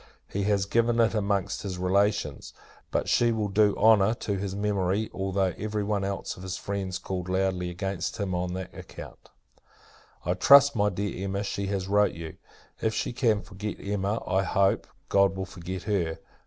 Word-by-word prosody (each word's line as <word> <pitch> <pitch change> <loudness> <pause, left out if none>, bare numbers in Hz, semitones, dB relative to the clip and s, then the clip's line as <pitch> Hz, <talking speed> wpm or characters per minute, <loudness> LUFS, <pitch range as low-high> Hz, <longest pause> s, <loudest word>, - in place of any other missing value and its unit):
He 100 0 -2
has 100 -2 +2
given 115 +3 +2
it 115 -1 +4
amongst 100 -3 0
his 95 -3 -4
relations. 100 +3 0 0.4
But - - -1
she 120 0 +3
will 110 -2 -1
do 105 +1 +3
honour 110 0 +5
to 100 -3 -3
his 95 0 -3
memory, 100 0 0
although 95 -1 0
every 105 0 -2
one 100 -1 -1
else 100 0 -3
of - - -12
his 95 -1 -4
friends 95 -2 -3
call 90 -1 -4
loudly 95 -1 0
against 95 +1 -3
him 100 -3 -2
on 90 0 -2
that 95 0 -6
account." - - -11 1.0
I - - +2
trust, 140 0 +7
my 105 -1 +3
dear 95 -1 -3
Emma, 100 +1 -2
she 100 -1 -3
has 95 -1 -2
wrote 105 +1 +3
you. 80 -1 -8 0.4
If 110 0 0
she - - -2
can 115 -5 +1
forget 105 +1 -6
Emma, 100 +2 -2
I 95 +1 +2
hope, 95 0 +1 0.2
God 100 -1 +3
will 95 - -2
forget 95 0 -7
her! 90 -6 -1
100 Hz, 180 wpm, -27 LUFS, 95-105 Hz, 1.0 s, trust